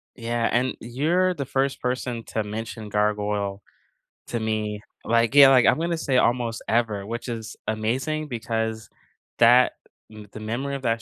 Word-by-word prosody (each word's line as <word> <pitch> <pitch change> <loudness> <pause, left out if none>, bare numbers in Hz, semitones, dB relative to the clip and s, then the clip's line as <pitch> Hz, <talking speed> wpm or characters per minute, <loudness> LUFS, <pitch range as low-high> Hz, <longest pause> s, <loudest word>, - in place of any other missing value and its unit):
Yeah, 115 -1 -1
and 125 +2 +1
you're 165 +10 +1
the 140 -5 -4
1st 135 +1 -1
person 125 -2 -2
to 110 - -2
mention 110 +1 -6
Gargoyle 105 -1 -1 0.7
to 120 - -2
me, 110 -1 -2 0.2
like, 115 +1 +2
yeah, 140 -1 +10
like, 130 -2 +5
I'm - - +4
gonna 170 0 -1
say 135 -5 0
almost 120 -2 +1
ever, 110 -4 0
which 115 +3 -5
is 115 -2 -6
amazing 130 +8 -1
because 110 -3 -3 0.5
that 120 +2 +6 0.4
m 105 -1 -11
the - - -7
memory 120 +6 -3
of 135 - -7
that 115 -1 0
115 Hz, 160 wpm, -24 LUFS, 110-130 Hz, 0.7 s, yeah